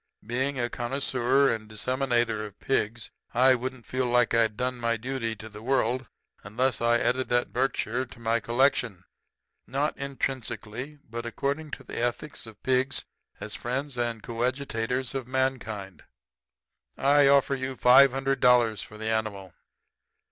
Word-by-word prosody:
Being 130 +4 -1
a 120 - +1
connoisseur 130 +1 +1
and 110 -1 -6
disseminator 120 -1 0
of 105 -2 -9
pigs, 115 -3 -1 0.2
I 130 +2 +6
wouldn't 130 -1 -4
feel 130 0 -1
like 120 0 +3
I'd 110 -2 +2
done 125 0 -1
my 115 -1 0
duty 120 -1 -3
to 110 +1 -9
the 105 -1 -10
world 130 0 0 0.4
unless 125 +6 0
I 120 0 +4
added 125 +2 0
that 120 0 +1
Berkshire 130 -1 0
to 120 - -14
my 115 0 +1
collection. 115 -6 +1 0.6
Not 140 +3 -1
intrinsically, 130 -1 -4
but 115 +1 -5
according 140 +6 -2
to 135 - -15
the - - -6
ethics 120 +2 -3
of 110 -2 -14
pigs 130 +1 +1 0.3
as 105 - -6
friends 130 +6 -3
and 120 -2 -2
coadjutors 125 0 -2
of 130 -3 -4
mankind, 120 -7 -2 1.0
I 140 +1 +5
offer 140 0 +4
you 130 0 -3
five 130 +3 +7
hundred 135 +1 -1
dollars 120 -4 +4
for 105 - -10
the 110 - -6
animal.' 100 -4 -2
125 Hz, 150 wpm, -27 LUFS, 115-130 Hz, 1.0 s, five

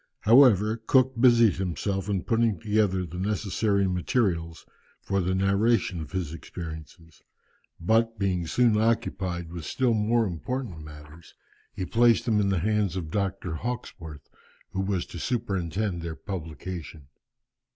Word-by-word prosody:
However, 110 -2 +5
Cook 130 +3 +3
busied 120 -6 +5
himself 95 +2 -2
in 95 -3 -1
putting 115 -5 +1
together 105 -1 +1
the 90 +2 -7
necessary 100 0 0
materials 90 -3 -1 0.3
for 100 0 -1
the 90 +1 0
narration 100 -1 +1
of 80 - -8
his 90 -5 -3
experiences; 80 0 -9 0.6
but, 115 +5 +1
being 90 -4 -1
soon 110 +2 +3
occupied 95 -7 -1
with 85 -2 -7
still 125 - 0
more 110 +2 +2
important 100 +1 -4
matters, 75 +1 -13 0.4
he 95 - -4
placed 115 +4 +3
them 110 -3 +2
in 100 -1 +1
the 95 - +1
hands 105 -2 0
of 80 -4 -5
Dr. 95 -3 -2
Hawkesworth, 80 - -6 0.4
who 95 - -2
was 95 -2 -1
to 85 - -9
superintend 95 -4 -2
their 85 -1 -5
publication. 80 -5 -7
95 Hz, 135 wpm, -26 LUFS, 85-110 Hz, 0.6 s, However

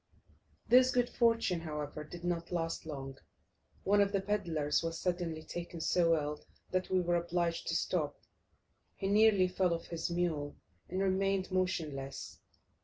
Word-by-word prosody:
This 255 +1 +7
good 245 -1 +1
fortune, 230 -7 +2
however, 150 -2 -5
did 170 +3 -10
not 170 -1 -2
last 165 -2 -2
long; 135 -3 -6 0.6
one 205 +1 +4
of 200 0 +3
the 200 - +2
pedlars 170 -7 0
was 165 0 -3
suddenly 175 -3 -2
taken 175 0 -6
so 165 0 +3
ill 150 -1 -3 0.3
that 185 0 0
we 185 - +3
were 175 0 +2
obliged 170 0 -1
to - - 0
stop. - - -1 0.8
He 195 - -3
nearly 205 -2 +5
fell 180 -1 +1
off 165 - -7
his 170 0 -3
mule, 170 -4 -1 0.3
and 190 +2 -1
remained 195 0 +1
motionless. 155 -7 -2
175 Hz, 150 wpm, -33 LUFS, 160-190 Hz, 0.8 s, This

